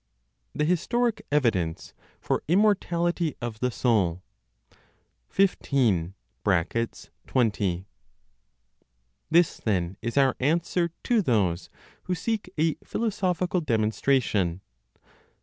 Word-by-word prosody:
THE 150 - +1
HISTORIC 220 +6 0
EVIDENCE 105 - 0 0.3
FOR - - -1
IMMORTALITY 175 -4 +2
OF 120 -2 -5
THE 125 - +1
SOUL. 100 -8 +1 1.1
15. 120 - +1 0.3
(20). 100 0 -1 1.4
This, 170 +1 +4
then, 95 -4 -1
is 120 +3 -3
our 135 -2 +4
answer 170 +4 +1
to 235 -3 +3
those 100 - 0 0.4
who 180 - -1
seek 210 +2 -2
a 160 +1 +2
philosophical 185 -5 -1
demonstration. 110 - +1
135 Hz, 85 wpm, -26 LUFS, -, 1.4 s, This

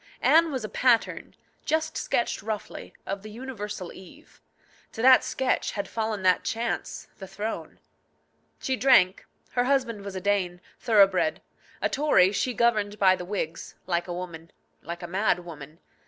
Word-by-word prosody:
Anne 325 0 +5
was 260 -4 -3
a - - -6
pattern 240 +2 +1 0.3
just 315 +1 -1
sketched 235 - -1
roughly 215 -1 -6
of 195 0 -4
the 215 - -10
universal 210 -6 -6
Eve. 280 - -16 0.5
To 225 - -5
that 260 0 +7
sketch 265 -1 -1
had 200 -1 -3
fallen 220 -3 -3
that 185 -1 +3
chance, 230 +1 -3
the 190 - -8
throne. 205 +4 -5 0.8
She 260 - -1
drank. 245 -8 +4 0.2
Her 245 0 +1
husband 250 -6 0
was 200 -1 -7
a - - -2
Dane, 185 -3 0 0.2
thoroughbred. 205 +5 +3 0.4
A - - +2
Tory, 270 -10 +4
she 245 +4 -1
governed 210 -3 +1
by 190 -2 +5
the 180 - -7
Whigs 170 -4 -4
like 175 -1 -1
a 175 - -4
woman, 170 -2 -7 0.3
like 170 +1 -7
a - - -4
mad 180 -1 0
woman. 155 -2 -10
205 Hz, 155 wpm, -26 LUFS, 185-240 Hz, 0.8 s, that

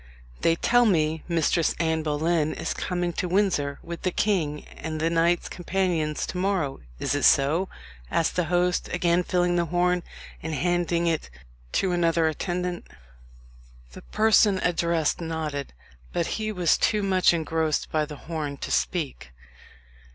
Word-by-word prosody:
"They 165 - +3
tell 245 +7 +3
me 160 -4 +1
Mistress 165 -1 +1
Anne 160 -1 +1
Boleyn 155 +1 0
is - - -3
coming 175 -1 -2
to 180 - -2
Windsor 175 -7 +1
with 170 0 -7
the 185 - +1
king 170 -7 0
and 155 0 -6
the 165 +1 +1
knights 170 +1 +2
companions 175 -4 -1
to 180 - -5
morrow 180 -8 0 0.2
is - - -1
it 145 - 0
so?" 155 +7 +3 0.4
asked 165 - 0
the 180 - +1
host, 175 +1 +1
again 175 0 +2
filling 175 0 +1
the 170 - +2
horn, 180 +1 +1 0.4
and 160 -1 -3
handing 175 +1 0
it 165 - -1 0.4
to 190 - +1
another 170 -2 +2
attendant. 175 +2 -3 1.0
The - - -11
person 215 -2 +3
addressed 170 -2 +1
nodded, 155 -4 -4 0.4
but 170 - 0 0.2
he 215 0 -1
was 180 -5 +2
too 210 -2 +2
much 185 -2 +4
engrossed 160 -2 -1
by 155 -1 +1
the 150 0 -8
horn 155 -4 -4
to - - -6
speak. 140 - -2
170 Hz, 150 wpm, -25 LUFS, 155-180 Hz, 1.0 s, much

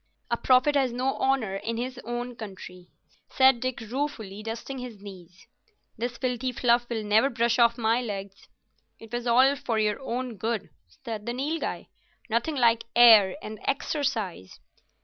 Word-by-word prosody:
"A - - +3
prophet 255 +4 +4
has 270 -3 +2
no 255 +3 -1
honour 255 -8 0
in 225 +3 -4
his 250 +1 -4
own 240 +1 -4
country," 185 -4 -10 0.4
said 265 -2 +4
Dick, 255 0 -3
ruefully, 225 -4 -4
dusting 230 +4 -6
his 245 -4 -8
knees. 185 -3 -13 0.5
"This 240 +1 -4
filthy 255 0 -2
fluff 240 0 +2
will 225 -2 -2
never 215 +6 +3
brush 235 -1 +1
off 235 0 +4
my 230 +1 +1
legs." 200 -4 -7 0.5
"It 225 +1 -14
was 240 0 -3
all 260 +4 +5
for 235 -4 -2
your 210 -1 +1
own 250 -3 -4
good," 220 +2 -3 0.2
said 215 - -8
the 235 - -1
Nilghai. 295 +6 -3 0.5
"Nothing 235 +7 0
like 230 -3 +3
air 220 -6 +7
and 215 0 -7
exercise." 240 - -2
235 Hz, 155 wpm, -26 LUFS, 215-255 Hz, 0.5 s, air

